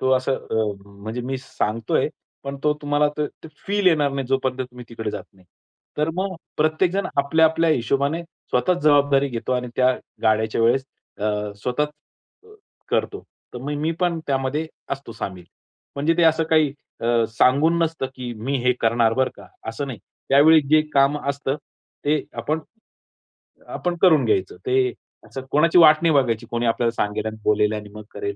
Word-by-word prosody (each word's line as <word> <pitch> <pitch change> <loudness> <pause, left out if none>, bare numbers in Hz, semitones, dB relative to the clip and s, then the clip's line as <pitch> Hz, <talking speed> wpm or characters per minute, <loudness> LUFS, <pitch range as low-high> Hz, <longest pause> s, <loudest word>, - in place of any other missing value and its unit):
तो 130 - +1
असं 130 +1 +2
अ, - - -7 0.3
म्हणजे 110 +4 -6
मी 130 +2 -3
सांगतोय, 115 -3 -1 0.4
पण 140 0 -4
तो 150 - +3
तुम्हाला 145 0 +2
ते 150 - +1
ते 160 - -15 0.2
फील 200 -1 0
येणार 150 -5 +4
नाही, 135 -2 -3
जोपर्यंत 130 0 -1
तुम्ही 125 -1 -7
तिकडे 110 -2 -4
जात - - -6
नाही. 95 -1 -23 0.5
तर 150 +1 +1
मग 190 +1 -2 0.2
प्रत्येकजण 170 +5 +1
आपल्या-आपल्या 160 +3 +3
हिशोबाने 140 +5 0
स्वतःचं 170 0 -2
जबाबदारी 145 -2 +4
घेतो 120 0 -3
आणि 125 0 -1
त्या 130 0 +4 0.3
गाड्याच्या 110 0 +2
वेळेस 130 +3 +3 0.3
अ, 105 0 -2
स्वतःचं 150 +4 -1 0.6
अ, - - -16 0.4
करतो. - - -1 0.3
तर 125 - -4
मग 145 +2 -3
मी 160 +2 0
पण 175 -2 +1
त्यामध्ये 135 +3 -1 0.2
असतो 135 -4 -5
सामील. 90 -4 -6 0.5
म्हणजे 150 +4 +2
ते 175 - +5
असं 160 0 +4
काही 155 -3 +4 0.3
अ, 115 0 +2
सांगून 140 +8 +3
नसतं, 165 -4 -1
की 125 -2 -6
मी 130 +6 -2
हे 125 - +5
करणार 115 0 +3
बरं 130 +1 +1
का, - - -13 0.2
असं 115 +6 -3
नाही. 125 -6 -6 0.3
त्यावेळी 155 +4 +7
जे 155 - +6
काम 140 +1 +3
असतं, 140 0 -1 0.5
ते 150 +1 +2 0.2
आपण, 155 +2 -1 1.1
आपण 175 -1 -3
करून 160 -8 +5
घ्यायचं. 95 -5 0
ते 130 -1 +2 0.3
असं 135 - -6
कोणाची 165 +4 +4
वाट 155 -3 +8
नाही 165 -2 +3
बघायची, 120 -5 +1
कोणी 120 0 -1
आपल्याला 115 0 +1
सांगेल 105 -2 -2
आणि 110 0 -4
बोलेल 105 0 +2
आणि 105 -1 -6
मग 105 0 -9
करेल. 405 0 -4
135 Hz, 170 wpm, -22 LUFS, 115-155 Hz, 1.1 s, वाट